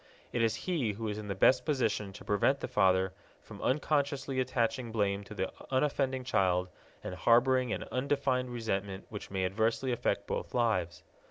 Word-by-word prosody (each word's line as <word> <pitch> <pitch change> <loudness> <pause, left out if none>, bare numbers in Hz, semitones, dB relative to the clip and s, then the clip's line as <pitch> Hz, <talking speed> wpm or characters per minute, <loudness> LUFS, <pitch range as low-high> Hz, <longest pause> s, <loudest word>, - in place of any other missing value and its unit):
It 120 - +1
is 115 -1 +2
he 150 - 0
who 110 +2 -4
is 105 0 -3
in 105 - -7
the 100 - -2
best 125 +6 +4
position 110 -9 0
to - - -11
prevent 120 +7 +2
the - - -2
father 95 -1 +3 0.3
from - - -11
unconsciously 140 -1 0
attaching 125 -1 0
blame 100 -2 0
to 105 - -10
the 95 -1 -2 0.2
unoffending 130 -1 +1
child 90 -6 +1 0.3
and - - -5
harboring 125 +4 +3
an - - -2
undefined 130 -1 0
resentment 100 -5 -3
which 105 - -7
may 95 -1 -1
adversely 110 +7 0
affect 120 - 0
both - - -4
lives. 110 -8 0
115 Hz, 170 wpm, -31 LUFS, 100-130 Hz, 0.3 s, best